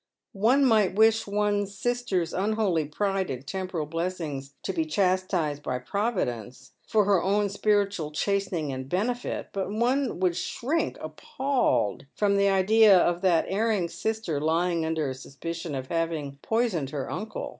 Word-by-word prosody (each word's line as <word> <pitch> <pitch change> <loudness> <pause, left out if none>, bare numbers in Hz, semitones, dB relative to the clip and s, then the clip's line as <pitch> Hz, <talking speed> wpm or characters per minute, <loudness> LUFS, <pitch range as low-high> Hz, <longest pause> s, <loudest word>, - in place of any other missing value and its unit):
One 260 +6 +5
might 215 -6 +3
wish 220 +1 +4
one 205 0 +1
sister's 200 -4 -2
unholy 195 -5 +1
pride 195 +5 -1
in 130 -1 -4
temporal 185 +1 -3
blessings 155 -4 -4
to - - -2
be 325 - 0
chastised 185 - 0
by 130 -3 -2
Providence, 125 - -3 0.2
for 210 -2 +3
her 195 -3 +3
own 200 +2 +1
spiritual 200 -5 +1
chastening 175 -3 -1
and 130 0 -6
benefit, 240 - -2
but 195 -1 -2
one 245 +3 0
would 180 -2 +1
shrink 295 - -2
appalled 155 - -1
from 205 -1 +2
the 200 0 +4
idea 200 +1 +6
of 175 0 +2
that 180 -4 +3
erring 205 -3 0
sister 220 -10 -2
lying 165 +1 +1
under 160 -2 -1
a 130 - -2
suspicion 150 +4 -6
of 130 -1 -5
having 160 -4 -2
poisoned 220 - 0
her 140 -2 -4
uncle. 210 +5 -5
185 Hz, 145 wpm, -27 LUFS, 155-210 Hz, 0.2 s, idea